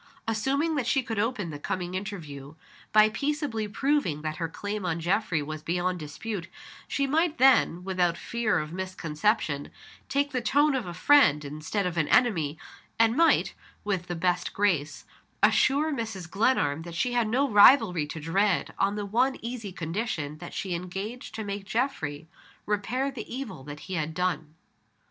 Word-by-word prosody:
Assuming 270 +9 0
that 250 -4 -1
she 270 0 +2
could 225 -3 -3
open 210 -6 -1
the 145 - -7
coming 180 +3 -3
interview 160 -8 -6 0.4
by 215 0 +6
peaceably 275 -3 -2
proving 210 - 0
that 155 0 -3
her 165 - -2
claim 205 +4 -4
on 170 -2 -1
Geoffrey 175 -2 0
was 155 +1 -6
beyond 180 +2 -1
dispute, 170 +5 -5 0.4
she 280 - 0
might 315 +3 +1
then, 250 -9 +4
without 180 -2 0
fear 235 +1 0
of 155 +1 -3
misconception, 170 -4 -1 0.4
take 285 +1 +1
the 250 - -1
tone 285 +6 +3
of 255 -7 -2
a 175 - -5
friend 215 - +5
instead 155 +8 -3
of 175 -1 -2
an 155 -3 +2
enemy, 165 - +2 0.4
and 225 0 +4
might, 330 +3 +3 0.3
with 190 -4 -2
the 175 - -3
best 180 +1 0
grace, 165 -8 0 0.4
assure 295 +3 +4
Mrs. 220 -8 -4
Glenarm 175 - +1
that 170 0 -8
she 245 +7 0
had 240 -2 +2
no 260 +6 +2
rivalry 205 - +6
to 155 - -6
dread, 190 +6 +1
on 200 +1 +2
the 205 -1 -3
one 250 +6 +1
easy 235 -4 -5
condition 165 -4 -3
that 175 - -9
she 190 -2 -3
engaged 195 +7 -5
to 220 - -4
make 200 -1 -4
Geoffrey 180 - -2 0.4
repair 225 +7 -1
the 245 -5 -8
evil 220 - -6
that 145 0 -8
he 190 - -7
had 160 -2 -2
done. 160 -4 -2
200 Hz, 165 wpm, -27 LUFS, 165-240 Hz, 0.4 s, by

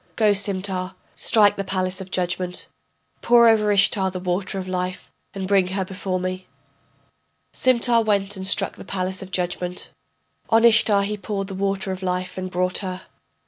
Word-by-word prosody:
Go, 215 -2 +3
Simtar, 190 -2 -1 0.2
strike 210 -2 +4
the 195 - -2
palace 185 0 -2
of 190 - -9
judgment, 180 0 -2 0.5
Pour 235 -1 +5
over 215 -2 +3
Ishtar 195 -1 +3
the 185 0 -6
water 185 +2 -3
of 185 -1 -5
life, 185 0 -4 0.2
and 190 -1 -4
bring 195 -2 +3
her 190 +1 -2
before 185 0 -4
me. 185 0 -5 1.1
Simtar 240 -2 +3
went 205 -2 0
and 190 0 -2
struck - - +3
the - - -10
palace 185 0 -3
of 190 - -9
judgment, 180 0 -3 0.6
On 225 0 +4
Ishtar 220 -3 +4
he 210 +1 -3
poured 195 0 -4
the - - -6
water 195 0 -2
of 185 0 -5
life 180 0 -3
and 185 0 -5
brought 180 0 0
her. 185 -2 -5
190 Hz, 170 wpm, -22 LUFS, 185-205 Hz, 1.1 s, Pour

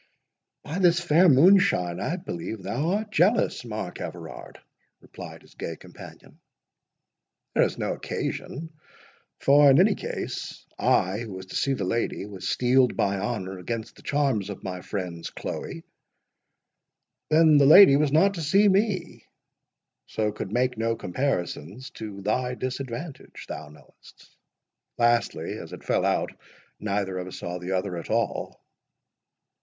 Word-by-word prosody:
"By 160 +5 -4
this 175 -2 +4
fair 175 +1 +4
moonshine, 135 - +4
I 165 - -1
believe 95 - -6
thou 135 - -1
art 210 +1 -2
jealous, 200 - +2
Mark 105 -6 -6
Everard!" - - -8 0.4
replied - - -11
his - - -20
gay - - -5
companion; - - -14 1.1
"there - - +3
is - - -4
no - - -1
occasion; 160 +3 -5 0.6
for, 145 +1 +6
in 135 - +6
any 200 +3 +5
case, - - -6
I, 95 +3 +2
who 115 -4 -6
was 95 0 -8
to 95 - -10
see 140 - +1
the 110 - -3
lady, 105 +1 -1
was 95 -2 -6
steeled 125 0 +3
by 100 0 +1
honour 95 -3 -4
against 115 +4 -5
the - - -16
charms 135 -9 0
of 100 - -8
my 90 -2 -5
friend's 90 -5 -5
Chloe—Then - - -6 1.8
the 140 - +5
lady 155 -2 +9
was 145 0 +2
not 190 +7 +4
to 170 - -5
see 195 +7 +4
me, 195 -3 0 0.8
so 105 -1 -1
could 100 -2 -6
make 125 0 0
no 115 0 0
comparisons 95 - -3
to 105 -3 -8
thy 125 +5 -1
disadvantage, 130 +3 -6
thou 80 -1 -7
knowest—Lastly, 75 - -4
as - - -9
it - - -10
fell - - +1
out, - - 0 0.5
neither 100 -2 -2
of 90 - -5
us 95 - -8
saw 90 +1 -5
the 90 +2 -4
other 90 -1 -2
at 85 - -7
all." - - -2
120 Hz, 140 wpm, -26 LUFS, 95-150 Hz, 1.8 s, lady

